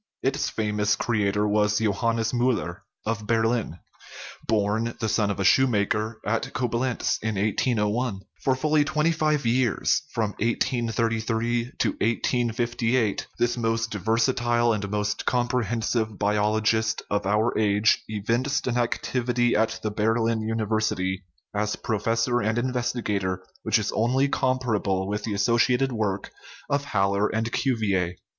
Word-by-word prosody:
Its 135 +1 0
famous 105 -1 0
cre 120 -2 -1
ator 105 +1 +1
was 105 0 +2
Johannes 115 +2 0
M 120 - 0
tiller, 110 -8 0 0.3
of 110 -1 -2
Berlin 115 -5 +1 0.7
(born, 110 +2 0
the 110 - -1
son 105 -1 +1
of 100 - -3
a - - +1
shoemaker, 110 -1 +2
at 115 +2 -1
Coblentz, 125 0 -1
in 110 -1 -2
1801). 105 +1 0 0.2
For 130 - +2
fully 150 +2 +2
twenty 155 +2 +1
five 155 -4 0
years 120 -1 +2
from 110 -3 -1
1833 115 0 0
to - - +2
1858 120 0 0
this 120 0 +1
most 115 -1 -1
versatile 120 +2 +1
and 100 -2 -3
most 105 0 -2
comprehensive 120 -3 0
biologist 110 +2 +1
of 100 -1 0
our 110 +3 +2
age 105 0 +3
evinced 115 +6 -1
an 125 -1 0
ac 120 -1 0
tivity 120 -1 +1
at 110 +1 +1
the 110 - -1
Berlin 115 +1 +1
University, 110 -4 -1 0.3
as 105 +1 -1
professor 115 +3 0
and 110 +2 0
in 125 +1 0
vestigator, 105 -7 -1 0.2
which - - +2
is - - -1
only 130 +5 +2
comparable 115 -9 0
with 105 +1 -3
the 105 -3 -2
asso 115 +4 +2
ciated 130 +3 +3
work 105 -4 -2 0.4
of 140 0 +1
Haller 100 -3 +1
and 115 +1 -2
Cuvier. 100 -10 0
115 Hz, 135 wpm, -25 LUFS, 105-120 Hz, 0.7 s, age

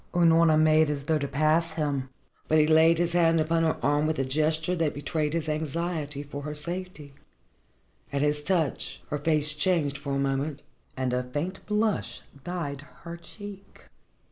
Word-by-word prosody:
Unorna 165 -2 +5
made 155 0 +4
as 145 -2 -2
though 160 -1 +1
she 140 - -2
would - - -15
pass 155 +4 +2
him. 140 -4 -2 0.4
But 155 - +3
he 155 - +5
laid 160 +1 +5
his 170 0 +1
hand 165 -1 +3
upon 165 +1 +1
her 160 -1 +1
arm 145 +2 +2
with 155 0 -1
a 135 - 0
gesture 155 +5 +1
that 160 -3 0
betrayed 150 +1 -2
his 165 -2 -2
anxiety 155 -1 -3
for 145 0 -7
her 150 +1 -5
safety. 170 -2 -5 1.0
At 140 0 0
his 150 0 0
touch, 165 -4 -1
her 150 - -1
face 155 -1 +2
changed 150 -3 0
for 140 - -4
a - - 0
moment 140 +1 -1 0.3
and 130 -1 -1
a 125 - +1
faint 150 +9 -4
blush 210 0 0 0.2
dyed 165 -6 -4 0.2
her 170 0 -6
cheek. 195 +3 -12
155 Hz, 175 wpm, -27 LUFS, 145-170 Hz, 1.0 s, Unorna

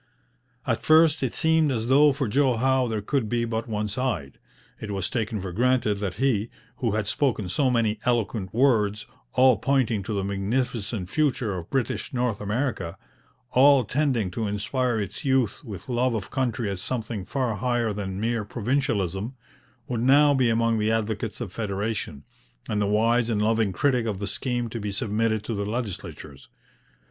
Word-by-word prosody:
At - - 0
first 160 0 +5
it 130 -3 0
seemed 160 -2 +2
as 115 -3 -1
though 145 +4 +5
for 135 -2 -2
Joe 130 +2 +2
Howe 130 +1 +2
there 110 -3 -3
could 125 -1 -1
be 120 -1 0
but 115 0 -3
one 105 -1 -1
side. 105 - -3 0.4
It 110 - -6
was 95 -3 -2
taken 110 -2 -2
for 95 -1 -5
granted 120 0 +1
that 100 -3 -3
he, 115 -2 +1 0.3
who 115 -5 -1
had 110 -1 0
spoken 110 -3 0
so 130 +10 +1
many 115 -3 +1
eloquent 110 -5 0
words, 110 -5 +2 0.3
all 130 -2 +5
pointing 125 -5 +1
to 105 +3 -4
the 100 -1 -1
magnificent 100 0 -2
future 130 -8 +1
of 85 -2 -7
British 135 0 -2
North 120 -4 -1
America, 105 -5 -2 0.5
all 135 0 +6
tending 125 -5 0
to 110 +3 -2
inspire 110 +4 -1
its 100 -3 -5
youth 130 -5 +1
with 105 -8 -8
love 125 -1 +1
of 105 -4 -5
country 120 -4 -1
as 100 -2 -3
something 115 -4 -3
far 130 +1 -1
higher 120 0 0
than 95 -2 -4
mere 115 0 0
provincialism, 110 -2 -1 0.5
would 120 -2 -2
now 145 +3 +5
be 130 -3 +3
among 115 0 +2
the 105 +1 +1
advocates 110 -1 -2
of 100 -6 -5
federation, 105 -7 -3 0.4
and 105 -1 -1
the 100 - +1
wise 115 +3 +2
and 110 -3 0
loving 110 -1 +2
critic 125 +4 +1
of 105 -3 -2
the 100 - -4
scheme 120 +2 -2
to 115 +1 -5
be 105 -1 -3
submitted 110 0 0
to 115 - -4
the 100 -1 -2
legislatures. 95 - -6
115 Hz, 175 wpm, -25 LUFS, 105-125 Hz, 0.5 s, all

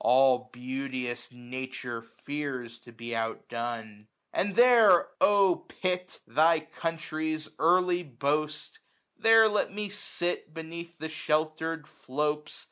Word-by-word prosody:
All 125 0 +4
beauteous 125 -1 -4
Nature 125 -1 -6
fears 130 -2 -6
to 120 0 -15
be 115 +1 -6
outdone. 115 -1 -4 0.2
1045 - - -46
And 200 0 0
there, 230 -7 +7
O 200 -3 +5
Pitt! 180 0 -3
thy 160 +1 +4
country's 155 -1 -3
early 180 +2 +3
boast^ 150 - -2 0.4
There 225 0 +7
let 210 -2 0
me 205 +1 -4
sit 175 -5 -3
beneath 170 +1 -8
the 160 +1 -4
shelter'd 155 0 -1
flopes. 150 +2 -3
155 Hz, 115 wpm, -29 LUFS, 125-175 Hz, 0.4 s, there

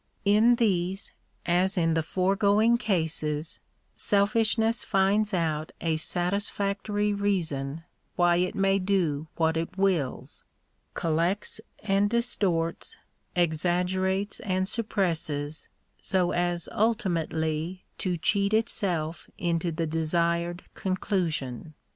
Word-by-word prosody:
In 215 +4 +5
these, 195 -4 0 0.3
as 185 +3 +2
in 165 -2 +2
the 160 - +2
foregoing 200 +7 +2
cases, 160 -7 -1 0.4
selfish 210 +2 +2
ness 225 +1 +1
finds 200 +2 +2
out 160 -4 -1
a 165 -1 0
satisfactory 200 +4 -1
reason 165 -8 -1 0.3
why 175 -1 +4
it 180 +1 0
may 195 0 +2
do 175 -6 0
what 160 -1 +1
it 165 +3 -4
wills 185 -9 -1 0.3
— - - -45
collects 170 +7 0 0.2
and 200 0 +2
distorts, 195 -8 -1 0.4
exaggerates 180 +4 +1
and 185 -1 -1
suppresses, 165 -9 -2 0.3
so 185 -2 +1
as 175 -1 0
ulti 205 -7 +1
mately 160 +3 -2 0.2
to 180 -2 -1
cheat 200 +4 +1
itself 175 -7 -1
into 170 0 0
the 165 +1 -2
desired 170 +2 0
conclusion. 165 - -2
180 Hz, 105 wpm, -27 LUFS, 165-200 Hz, 0.4 s, In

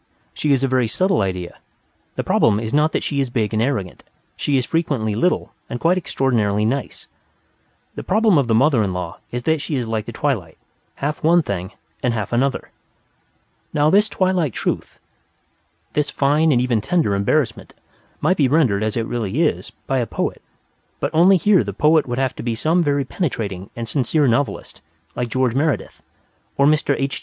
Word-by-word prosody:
She 150 - -1
is 135 -1 +2
a - - +3
very 130 -2 +1
subtle 185 - +1
idea. 90 -2 -4 0.6
The - - -2
problem 105 -2 +3
is 110 0 -4
not 150 +2 +3
that - - -1
she 140 - -1
is 135 - -2
big 110 -3 -1
and 110 - +1
arrogant; 115 -8 -2 0.3
she 140 -2 0
is 125 - 0
frequently 140 -10 -1
little 175 - 0 0.2
and 120 - -4
quite 170 +6 +3
extraordinarily 115 - 0
nice. 130 +4 -3 0.9
The - - -6
problem 215 -4 +3
of 135 - 0
the 115 - +2
mother 130 0 +4
in 95 -3 -1
law 90 -2 -5
is 120 0 -4
that 160 +1 +1
she 145 +1 -3
is 125 -3 -1
like 110 -1 -3
the - - -5
twilight: 110 - -2 0.4
half 150 +2 -3
one 170 +2 +4
thing 95 -4 -4 0.3
and 120 -2 0
half 110 +1 -4
another. 130 +3 0 1.0
Now, 150 +1 +3
this 210 +3 +4
twilight 185 - 0
truth, - - -3 1.0
this 150 0 0
fine 150 +3 +2
and 125 - +3
even 120 -3 +1
tender 165 - +1
embarrassment, 110 +5 -1 0.5
might 175 +5 +2
be 140 - +3
rendered, 130 -8 +2
as 110 +1 -1
it 115 - -1
really 120 - -1
is, 155 - -1 0.2
by 135 -1 0
a 120 - -1
poet, - - -3 0.7
only 180 +4 +6
here 190 - +3
the 100 -1 -5
poet 155 0 +3
would 120 0 -3
have 130 -1 0
to - - -5
be 115 -1 -2
some 160 +9 +1
very 145 -3 +1
penetrating 105 - -3
and 115 -1 -5
sincere 140 +3 +1
novelist, 130 +4 -1 0.3
like 120 -1 -2
George 130 0 +1
Meredith, 145 +2 -1 0.6
or 140 - +4
Mr. 150 -1 +2
H. 135 0 -2
130 Hz, 185 wpm, -20 LUFS, 110-155 Hz, 1.0 s, only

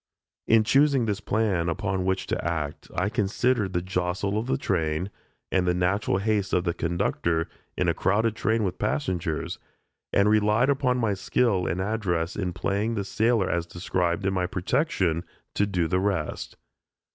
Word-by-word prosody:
In 110 -1 +5
choosing 135 +1 +3
this 105 -2 -2
plan 100 -6 0
upon 95 +2 -1
which 95 0 0
to - - -2
act, 80 -3 -3
I 90 - +1
considered 105 -1 0
the 85 - 0
jostle 90 +2 -1
of 115 - -4
the - - +1
train, 85 -1 -1 0.4
and 90 -1 +2
the 90 - +2
natural 95 +2 +1
haste 100 -1 0
of 90 - +3
the 85 -2 0
conductor, 85 -1 0 0.3
in - - +1
a - - +3
train - - -17 0.3
crowded 110 +1 0
with 95 - -2
passengers, 80 +1 -2 0.5
and 100 +1 +3
relied 105 +4 +3
upon 130 -2 +1
my 115 -4 +1
skill 95 0 +1
and 85 - -1
address 95 -4 -1
in 95 -3 -2
playing 100 +6 -1
the 100 -2 -2
sailor 110 -1 +2
as 85 0 -1
described 90 +1 -1
in 95 - +1
my 90 -1 0
protection, 95 - 0 0.3
to 100 - +1
do 90 -4 0
the 90 +3 +1
rest. 95 -5 -2
95 Hz, 170 wpm, -26 LUFS, 90-110 Hz, 0.5 s, In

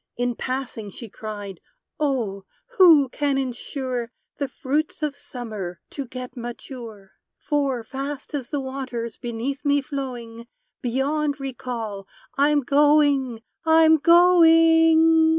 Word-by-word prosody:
In 245 0 0
passing 255 -4 -4
she 225 +3 -10
cried, 205 -3 -8 0.4
"Oh! 235 -10 -1 0.3
who 320 -7 +8
can 285 +1 -1
insure 255 -1 -3 0.3
The 280 - -1
fruits 300 +3 -2
of 295 -2 -1
Summer 215 -11 -7
to 275 -3 -5
get 255 0 -8
mature? 235 -4 -9 0.3
For, 275 -5 -1
fast 275 +4 -6
as 270 -5 -4
the 290 - -2
waters 260 -4 -5
beneath 245 +4 -4
me 285 0 +3
flowing, 245 -4 -6 0.3
Beyond 285 +3 -1
recall, 235 -7 -5 0.3
I'm 290 +1 +3
going! 280 -3 +3 0.2
I'm 320 0 +6
going!" 325 -1 +6
270 Hz, 115 wpm, -23 LUFS, 235-295 Hz, 0.4 s, who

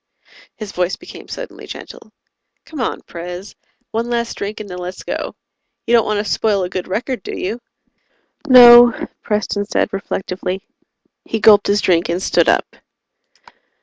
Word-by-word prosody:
His 215 -3 -7
voice 180 0 -1
became 355 - -12
suddenly - - -8
gentle. - - -10 0.5
"Come 315 - -9
on, 235 - -2
Pres. 180 +3 -8 0.4
One 230 +2 -2
last 235 -1 -1
drink, 205 +2 -5
and 215 - -7
then 180 -1 -7
let's 180 +1 -7
go. - - -4 0.5
You 235 - 0
don't 230 -2 +4
want 215 0 0
to 205 - -2
spoil 205 -2 +1
a 180 - -3
good 185 -1 -4
record, 240 +4 -3
do - - -6
you?" 215 +6 -3 0.9
"No," 240 -2 +8
Preston 210 -1 -2
said - - -1
reflectively. 190 -1 -4 0.6
He 225 - -3
gulped 210 -1 +6
his 205 +1 +2
drink 170 -2 +2
and 170 +1 0
stood - - +2
up. - - 0
205 Hz, 155 wpm, -18 LUFS, 185-235 Hz, 0.9 s, No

